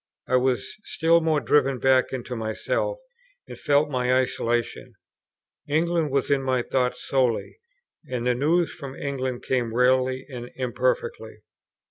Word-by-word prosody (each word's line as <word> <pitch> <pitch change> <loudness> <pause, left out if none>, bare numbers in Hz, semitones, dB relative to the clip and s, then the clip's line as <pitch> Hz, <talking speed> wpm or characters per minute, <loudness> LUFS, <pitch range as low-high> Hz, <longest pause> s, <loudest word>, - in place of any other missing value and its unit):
I 130 - +2
was 125 -3 0
still 165 -3 +2
more 160 -2 +2
driven 135 +1 +2
back 130 0 +3
into 125 -1 -5
myself, 115 - -2 0.5
and - - -8
felt 145 +1 +2
my 125 -1 0
isolation. 120 -2 -1 0.7
England 165 +1 +1
was 140 0 0
in 140 -1 +3
my 130 -2 0
thoughts 125 -1 -1
solely, 130 - 0 0.5
and 125 -2 -3
the 125 - +3
news 160 +7 +1
from 140 -4 -8
England 130 -3 -3
came 120 -3 -1
rarely 130 +1 +2
and 125 -3 -8
imperfectly. 470 - -2
130 Hz, 135 wpm, -25 LUFS, 125-145 Hz, 0.7 s, back